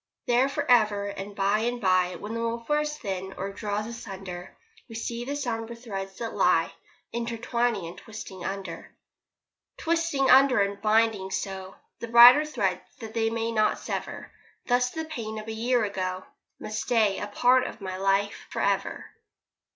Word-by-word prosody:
There 245 +3 +3
for 285 +1 -2
ever, 210 -5 +3
and 200 0 -7
by 200 +2 +2
and 240 +2 -1
by 185 -3 +2
When 210 +2 -6
the 230 - -3
woof 230 0 -3
wears 300 0 0
thin, 190 -6 -4
or 195 +1 -3
draws 210 +1 -3
asunder, 195 -6 -8 0.3
We 225 - -9
see 235 +1 -4
the 285 +2 -3
sombre 235 -4 -3
threads 195 -5 -6
that 230 -1 -4
lie - - +3 0.4
Intertwining 235 -3 -1
and 170 +2 -8
twisting 205 -4 -9
under. 195 +1 -6 0.8
Twisting 330 -5 +1
under 265 -2 +6
and 200 0 0
binding 215 -2 +2
so 190 0 -4 0.2
The 235 - -5
brighter 240 +6 +9
threads 190 -11 -1 0.2
that 220 -2 -8
they 225 -1 +1
may 230 0 -2
not 215 -1 +2
sever. - - -5 0.3
Thus 245 0 +2
the 320 +4 -5
pain 230 -8 -5
of 215 0 -7
a 225 - -4
year 240 +2 +1
ago 185 -2 -3 0.3
Must 215 0 -4
stay 220 -5 +2
a 205 - -4
part 245 +5 +3
of - - -9
my 190 -2 -5
life 195 +1 0
for - - -5
ever. - - 0
225 Hz, 165 wpm, -27 LUFS, 195-240 Hz, 0.8 s, brighter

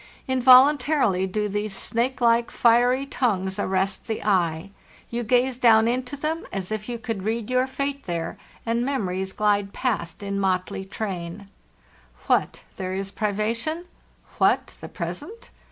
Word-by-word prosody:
involuntarily 260 -5 +5
do 210 +2 -1
these 205 0 -2
snake 245 +3 0
like, 235 0 +3
fiery 245 +3 +3
tongues 195 -8 -1
arrest 190 0 -1
the 220 - -3
eye; 180 -2 +1 0.4
you 235 +1 -2
gaze 245 +2 +2
down 225 -3 +5
into 250 +3 -1
them 315 +3 -2
as 190 0 -4
if 215 +1 -4
you 240 - -3
could 225 -3 -4
read 220 +3 -2
your 255 +1 +2
fate 275 +1 -3
there, 170 -2 -3 0.3
and 235 +1 0
memories 190 -8 -2
glide 205 -1 +1
past 205 -7 -2
in 200 0 -2
motley 190 0 -1
train. 190 -1 -5 0.8
What, - - +1
then, 185 -1 -3
is 195 0 -4
privation? 230 - -2 0.5
What - - +2
the - - -8
present? 460 +3 -6
220 Hz, 140 wpm, -24 LUFS, 195-250 Hz, 0.8 s, involuntarily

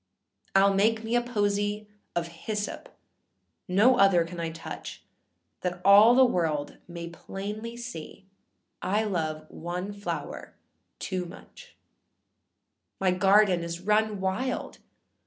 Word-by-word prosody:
Iâll 195 0 +5
make 220 +3 +2
me 225 +2 -1
a 240 - +4
posy 205 -2 -1 0.3
of 170 -1 0
hyssop, 205 +5 -5 0.8
âno 215 +8 +5
other 190 -4 +5
I - - -10
can 170 -2 -4
touch,â 165 - -8 0.6
That 180 -1 -3
all 205 +4 +8
the 260 0 +7
world 160 -10 -1
may 170 -1 -7
plainly 210 +6 -6
see 205 -5 -8 0.6
I 200 +4 +1
love 155 -6 -2
one 180 +4 -5
flower 205 0 -6 0.4
too 185 -2 -3
much; 170 - -13 1.2
My 190 -1 +3
garden 195 0 +4
is 170 +1 -5
run 210 +1 +1
wild! 190 +8 -2
195 Hz, 120 wpm, -27 LUFS, 175-215 Hz, 1.2 s, all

